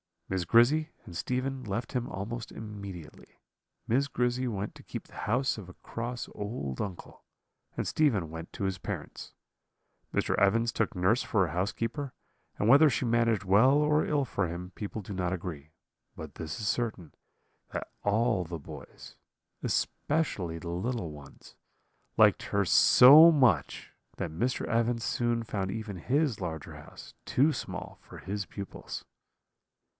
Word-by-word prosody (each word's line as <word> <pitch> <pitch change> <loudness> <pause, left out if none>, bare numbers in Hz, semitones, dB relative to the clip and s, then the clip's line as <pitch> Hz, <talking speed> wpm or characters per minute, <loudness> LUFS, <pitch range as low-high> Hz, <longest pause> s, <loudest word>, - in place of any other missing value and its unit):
"Miss 95 -2 -1
Grizzy 135 - +4 0.2
and 85 - -10
Stephen 130 +8 -2
left 115 +2 -3
him 125 -3 -2
almost 115 +5 -5
immediately. 100 -7 -9 0.4
Miss 135 +5 +2
Grizzy 125 -1 0
went 100 -3 -3
to - - -12
keep - - -7
the - - -20
house 125 +4 +1
of 95 - -10
a 90 - -11
cross 120 +5 -5
old 100 - -5
uncle, 95 -4 -7 0.5
and - - -1
Stephen 105 - +1
went 80 +1 -8
to - - -5
his 95 -1 -1
parents. - - -6 0.8
Mr. - - +1
Evans 115 +4 +3
took 110 -2 -1
nurse 95 +7 +2
for 100 -5 +1
a 80 - -5
housekeeper, 115 - -2 0.4
and 105 - 0
whether 145 +5 +7
she 130 - -1
managed 115 -3 +2
well 105 +8 +5
or 150 +1 +3
ill 145 -2 +1
for 100 -4 -1
him 90 +2 -6
people 105 +1 -5
do 100 +1 -7
not 90 -1 -1
agree; 80 -4 -6 0.4
but 80 -3 -9
this 80 +4 -5
is 105 - -2
certain, 110 -8 -2 0.6
that - - -5
all 105 -2 +2
the 85 0 -5
boys, 75 - -11 0.4
especially 105 - -1
the 85 +1 -7
little 90 0 -2
ones, 70 -2 -13 0.6
liked - - +5
her - - +1
so 150 +7 +9
much 120 - +2 0.2
that - - -4
Mr. 120 +11 -1
Evans 115 0 0
soon 120 0 0
found 100 -4 -3
even 105 -1 -5
his 135 - 0
larger 80 -5 -5
house - - -12
too 145 +5 +3
small - - -6
for - - -12
his 100 +1 -4
pupils. 100 -1 -7
110 Hz, 150 wpm, -29 LUFS, 90-125 Hz, 0.8 s, so